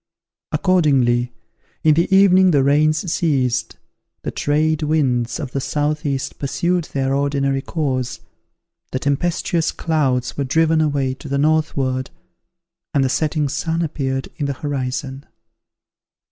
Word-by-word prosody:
Accordingly, 135 Hz, -10 st, +2 dB, 0.5 s
in 155 Hz, -, +5 dB
the 170 Hz, +5 st, +1 dB
evening 190 Hz, -1 st, +6 dB
the 145 Hz, -5 st, +3 dB
rains 155 Hz, +4 st, +2 dB
ceased, 130 Hz, -7 st, 0 dB, 0.5 s
the -, -, -3 dB
trade 155 Hz, +1 st, 0 dB
winds 135 Hz, -5 st, 0 dB
of 140 Hz, -5 st, -5 dB
the 135 Hz, -, -2 dB
southeast 145 Hz, -1 st, -2 dB
pursued 170 Hz, +5 st, 0 dB
their 135 Hz, -2 st, -1 dB
ordinary 140 Hz, -1 st, 0 dB
course, 130 Hz, -5 st, -2 dB, 0.7 s
the -, -, -1 dB
tempestuous 160 Hz, +4 st, 0 dB
clouds 135 Hz, -6 st, 0 dB
were 140 Hz, -, -1 dB
driven 160 Hz, +4 st, +2 dB
away 140 Hz, -4 st, 0 dB
to 135 Hz, +2 st, -10 dB
the 140 Hz, -, 0 dB
northward, 140 Hz, -4 st, 0 dB, 0.9 s
and 140 Hz, -, +4 dB
the 130 Hz, -, +1 dB
setting 150 Hz, +1 st, 0 dB
sun 160 Hz, +4 st, -1 dB
appeared 135 Hz, -4 st, -2 dB
in 145 Hz, -, -1 dB
the 140 Hz, -, -1 dB
horizon. 135 Hz, -1 st, -4 dB
145 Hz, 125 wpm, -20 LUFS, 135-155 Hz, 0.9 s, evening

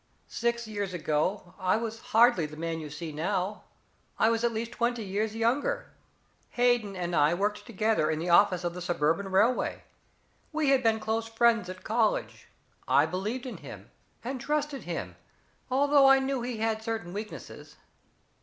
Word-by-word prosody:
Six 235 Hz, 0 st, -1 dB
years 205 Hz, -4 st, -3 dB
ago 175 Hz, +4 st, -1 dB
I 185 Hz, +2 st, +2 dB
was 225 Hz, 0 st, -4 dB
hardly 225 Hz, -8 st, +5 dB
the 150 Hz, 0 st, -11 dB
man 165 Hz, 0 st, -3 dB
you 155 Hz, -2 st, -7 dB
see 155 Hz, +2 st, -6 dB
now 185 Hz, +6 st, -2 dB, 0.5 s
I 225 Hz, -, +4 dB
was 230 Hz, 0 st, 0 dB
at 235 Hz, -, +2 dB
least 230 Hz, +1 st, -4 dB
twenty 240 Hz, -1 st, -1 dB
years 210 Hz, +3 st, -2 dB
younger. 235 Hz, +5 st, 0 dB, 0.7 s
Hayden 240 Hz, -5 st, +2 dB
and 175 Hz, -1 st, -2 dB
I 150 Hz, +3 st, +4 dB
worked 205 Hz, +3 st, -2 dB
together 220 Hz, -6 st, +1 dB
in 155 Hz, -, 0 dB
the 165 Hz, +3 st, -3 dB
office 180 Hz, 0 st, +5 dB
of 175 Hz, -1 st, -2 dB
the 180 Hz, -, -7 dB
Suburban 175 Hz, +2 st, 0 dB
Railway. 215 Hz, +6 st, +1 dB, 0.7 s
We 310 Hz, -3 st, +1 dB
had 270 Hz, -1 st, +4 dB
been 225 Hz, -2 st, +2 dB
close 225 Hz, +1 st, -2 dB
friends 225 Hz, -3 st, +2 dB
at 185 Hz, 0 st, -8 dB
college 220 Hz, 0 st, 0 dB, 0.4 s
I -, -, +5 dB
believed 200 Hz, +10 st, -3 dB
in 255 Hz, -, -6 dB
him -, -, -11 dB, 0.3 s
and 255 Hz, +1 st, -4 dB
trusted 295 Hz, -1 st, -2 dB
him, -, -, -5 dB, 0.5 s
although 280 Hz, +1 st, +5 dB
I 270 Hz, -, +7 dB
knew 265 Hz, -1 st, -1 dB
he 240 Hz, -1 st, -4 dB
had 220 Hz, 0 st, -1 dB
certain 220 Hz, -6 st, -4 dB
weaknesses. 210 Hz, +2 st, -8 dB
220 Hz, 165 wpm, -28 LUFS, 180-235 Hz, 0.7 s, I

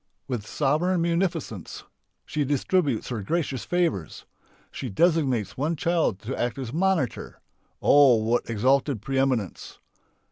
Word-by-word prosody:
With 120 Hz, -6 st, -4 dB
sovereign 155 Hz, +6 st, +1 dB
munificence 170 Hz, -, -2 dB, 0.4 s
she 150 Hz, -, -1 dB
distributes 145 Hz, -, 0 dB
her 120 Hz, -4 st, -3 dB
gracious 140 Hz, -, -2 dB
favours. 170 Hz, -, -1 dB, 0.5 s
She 130 Hz, -, -5 dB
designates 135 Hz, -, +1 dB
one 150 Hz, +5 st, 0 dB
child 165 Hz, -, +1 dB
to 125 Hz, +5 st, -4 dB
act 120 Hz, 0 st, -2 dB
as 130 Hz, -3 st, -5 dB
"monitor" 165 Hz, -8 st, -1 dB, 0.4 s
(oh, 140 Hz, -4 st, +6 dB
what 115 Hz, +2 st, 0 dB
exalted 130 Hz, +1 st, +1 dB
pre 135 Hz, +2 st, -1 dB
eminence!) 125 Hz, -8 st, -1 dB
135 Hz, 120 wpm, -25 LUFS, 115-165 Hz, 0.5 s, oh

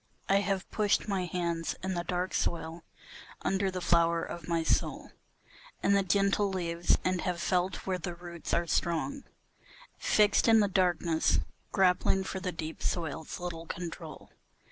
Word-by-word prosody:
I 195 Hz, -, +4 dB
have 195 Hz, -1 st, -1 dB
pushed 210 Hz, 0 st, +1 dB
my 195 Hz, -3 st, 0 dB
hands 170 Hz, -2 st, -2 dB
in 190 Hz, 0 st, -1 dB
the 175 Hz, -1 st, -2 dB
dark 180 Hz, +1 st, -2 dB
soil, 165 Hz, 0 st, -2 dB, 0.6 s
under 195 Hz, 0 st, +1 dB
the 185 Hz, -1 st, -4 dB
flower 170 Hz, -1 st, +3 dB
of 170 Hz, -2 st, -7 dB
my 165 Hz, -1 st, +1 dB
soul -, -, 0 dB, 0.7 s
And 200 Hz, -, +4 dB
the 200 Hz, -, +4 dB
gentle 200 Hz, +1 st, +2 dB
leaves, 175 Hz, -2 st, +1 dB
and 185 Hz, -1 st, +1 dB
have 180 Hz, -2 st, -2 dB
felt 180 Hz, +1 st, 0 dB
where 185 Hz, -1 st, -1 dB
the 175 Hz, 0 st, -4 dB
roots 170 Hz, -1 st, -7 dB
are 170 Hz, -, +2 dB
strong 170 Hz, -, -1 dB, 0.7 s
Fixed 210 Hz, +1 st, +4 dB
in 225 Hz, -1 st, +7 dB
the 205 Hz, -, +4 dB
darkness, 175 Hz, -4 st, +2 dB, 0.3 s
grappling 190 Hz, 0 st, +3 dB
for 190 Hz, -, -4 dB
the 185 Hz, -1 st, -2 dB
deep 160 Hz, -1 st, -6 dB
soil's 160 Hz, 0 st, -3 dB
little 170 Hz, -2 st, -5 dB
control. 170 Hz, -2 st, -7 dB
180 Hz, 155 wpm, -30 LUFS, 170-190 Hz, 0.7 s, in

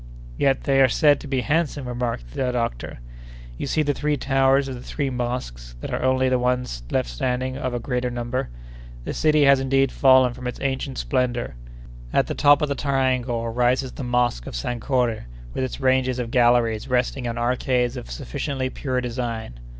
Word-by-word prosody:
"Yet 135 Hz, -, +1 dB
they 135 Hz, -1 st, +3 dB
are 130 Hz, -, +6 dB
said 145 Hz, +2 st, +4 dB
to -, -, -9 dB
be 135 Hz, -2 st, 0 dB
handsome," 145 Hz, -2 st, 0 dB
remarked 120 Hz, -, -3 dB
the 130 Hz, -1 st, -1 dB
doctor. 90 Hz, -, -3 dB, 0.6 s
"You -, -, -3 dB
see 155 Hz, -, +1 dB
the 145 Hz, -1 st, +1 dB
three 150 Hz, +1 st, -1 dB
towers 135 Hz, +1 st, +2 dB
of 135 Hz, -, -4 dB
the 120 Hz, -, -8 dB
three 140 Hz, +1 st, -3 dB
mosques 120 Hz, -, -4 dB
that -, -, -6 dB
are -, -, 0 dB
the -, -, -2 dB
only 130 Hz, 0 st, +2 dB
ones 125 Hz, -, -1 dB
left -, -, 0 dB
standing 125 Hz, -, -2 dB
of 130 Hz, -3 st, -3 dB
a -, -, -1 dB
great 125 Hz, 0 st, -2 dB
number—the -, -, -6 dB
city 155 Hz, -1 st, +3 dB
has 140 Hz, -1 st, +6 dB
indeed 135 Hz, 0 st, +2 dB
fallen 130 Hz, -2 st, +5 dB
from 125 Hz, 0 st, -7 dB
its 125 Hz, -, -5 dB
ancient 135 Hz, -1 st, -2 dB
splendor! 125 Hz, -, -1 dB, 0.6 s
At -, -, +3 dB
the -, -, -3 dB
top 145 Hz, 0 st, +4 dB
of -, -, +2 dB
the -, -, +1 dB
triangle 130 Hz, -4 st, 0 dB
rises 125 Hz, +2 st, +1 dB
the -, -, -7 dB
Mosque 120 Hz, -, 0 dB
of -, -, -6 dB
Sankore, 120 Hz, -, -1 dB, 0.3 s
with -, -, -2 dB
its 130 Hz, -, -4 dB
ranges 130 Hz, -1 st, +2 dB
of 120 Hz, -2 st, -3 dB
galleries 120 Hz, -3 st, +3 dB
resting 125 Hz, 0 st, 0 dB
on 115 Hz, 0 st, -3 dB
arcades 125 Hz, +1 st, 0 dB
of 125 Hz, -, -7 dB
sufficiently 130 Hz, -, -3 dB
pure 130 Hz, -3 st, -2 dB
design. 115 Hz, -, -4 dB
125 Hz, 185 wpm, -23 LUFS, 120-135 Hz, 0.6 s, are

